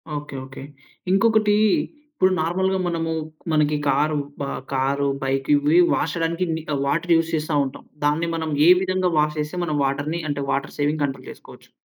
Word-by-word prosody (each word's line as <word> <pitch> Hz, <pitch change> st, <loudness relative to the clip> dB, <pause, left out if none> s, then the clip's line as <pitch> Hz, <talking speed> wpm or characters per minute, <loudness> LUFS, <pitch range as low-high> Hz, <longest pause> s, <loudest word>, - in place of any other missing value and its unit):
Okay. 145 Hz, -1 st, -6 dB
Okay. 135 Hz, 0 st, -10 dB, 0.5 s
ఇంకొకటీ 215 Hz, +1 st, +3 dB, 0.6 s
ఇప్పుడు 190 Hz, -10 st, +2 dB
నార్మల్‌గా 190 Hz, +4 st, 0 dB
మనము 165 Hz, -1 st, -2 dB, 0.4 s
మనకి 150 Hz, -1 st, +2 dB
కారు 150 Hz, +3 st, +2 dB, 0.2 s
బా 140 Hz, -, -2 dB, 0.3 s
కారు, 140 Hz, +1 st, 0 dB, 0.2 s
బైక్ 135 Hz, 0 st, -1 dB
ఇవీ 145 Hz, +4 st, +3 dB
వాష్ 150 Hz, 0 st, -1 dB
చేయడానికి 170 Hz, +2 st, -1 dB
మి 160 Hz, -, -3 dB
ఆహ్, 140 Hz, -, -1 dB
వాటర్ 165 Hz, +4 st, +1 dB
యూస్ 165 Hz, 0 st, +1 dB
చేస్తా 155 Hz, 0 st, -2 dB
ఉంటాం. 135 Hz, -, -8 dB, 0.2 s
దాన్ని 155 Hz, +3 st, +1 dB
మనం 160 Hz, -1 st, -3 dB, 0.2 s
ఏ -, -, +8 dB
విధంగా 185 Hz, -1 st, 0 dB
వాష్ 150 Hz, 0 st, +1 dB
చేస్తే 150 Hz, +4 st, -3 dB
మనం 155 Hz, -3 st, -1 dB
వాటర్‌ని 145 Hz, +5 st, -2 dB
అంటే 145 Hz, -1 st, -2 dB
వాటర్ 135 Hz, 0 st, -2 dB
సేవింగ్ 150 Hz, +1 st, 0 dB
కంట్రోల్ 135 Hz, -1 st, -4 dB
చేసుకోవచ్చు. -, -, -15 dB
155 Hz, 165 wpm, -22 LUFS, 145-170 Hz, 0.6 s, ఏ